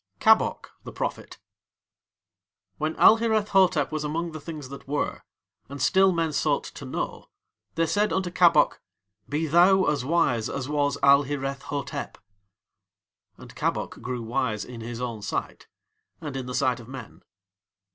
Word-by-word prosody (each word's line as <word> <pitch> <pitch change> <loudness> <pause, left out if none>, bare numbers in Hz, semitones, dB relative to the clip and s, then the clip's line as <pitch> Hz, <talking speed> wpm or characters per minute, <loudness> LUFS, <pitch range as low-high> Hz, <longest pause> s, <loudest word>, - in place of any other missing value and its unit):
KABOK - - +3
THE - - -8
PROPHET - - -5 1.4
When 155 +1 -1
Alhireth 220 -2 +4
Hotep 185 -7 +3
was 155 -1 -2
among 165 +3 -2
the 155 -1 -8
Things 150 -4 -8
that 140 0 -10
Were, 145 +1 -2 0.5
and 140 +1 -7
still 190 +7 +4
men 165 -3 -1
sought 145 - +1
to - - -9
know, - - -5 0.5
they 165 - +2
said 205 +6 +1
unto 185 -2 -1
Kabok: 170 -4 +4 0.5
"Be 150 +3 -1
thou 180 +5 +5
as 145 -3 0
wise 130 -7 +1
as 130 -2 -4
was 145 -1 0
Alhireth 140 0 +3
Hotep." 140 0 -5 1.2
And - - -13
Kabok - - -2
grew 125 -1 -4
wise 115 -2 -2
in 120 -2 -9
his 115 +1 -6
own 120 -4 -4
sight 100 - -4 0.5
and 145 -3 -6
in 130 -1 -4
the 125 - -4
sight 125 -1 +1
of 115 - -12
men. 120 -11 -10
145 Hz, 145 wpm, -26 LUFS, 130-165 Hz, 1.4 s, thou